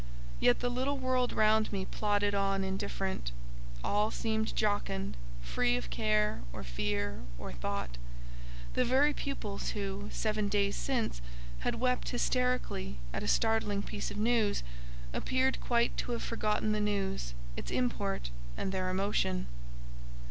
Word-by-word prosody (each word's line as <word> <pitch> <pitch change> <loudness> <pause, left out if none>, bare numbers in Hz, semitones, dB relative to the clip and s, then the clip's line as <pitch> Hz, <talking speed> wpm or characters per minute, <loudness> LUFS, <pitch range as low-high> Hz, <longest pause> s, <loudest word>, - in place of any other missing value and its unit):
Yet 120 - +4
the 245 - +1
little 265 +3 0
world 255 -1 +1
round 215 0 +4
me 195 -2 -1
plodded 205 0 +1
on 195 -1 +2
indifferent; 190 - -2 0.5
all 210 +1 +2
seemed 220 -1 -1
jocund, 205 -2 0 0.3
free 120 - +2
of 125 - -5
care, 215 -1 +2
or 65 - -6
fear, 100 +11 -1 0.2
or - - -6
thought: - - -3 0.7
the - - +3
very 275 +4 +4
pupils 215 -10 -3
who, 200 0 -3
seven 215 -1 0
days 200 -1 +2
since, 235 - -1 0.4
had - - 0
wept 250 0 +1
hysterically 250 - 0 0.2
at - - -1
a - - -3
startling 215 - +2
piece 205 - -3
of 205 - -6
news, 220 - +2 0.5
appeared 260 - +1
quite 235 -1 +2
to 245 - -1
have 235 - -2
forgotten 215 -1 +1
the 215 0 +1
news, 195 - -1 0.2
its - - -5
import, 200 - 0 0.3
and 190 - -1
their 185 -1 0
emotion. 190 -1 +1
205 Hz, 140 wpm, -33 LUFS, 190-230 Hz, 0.7 s, Yet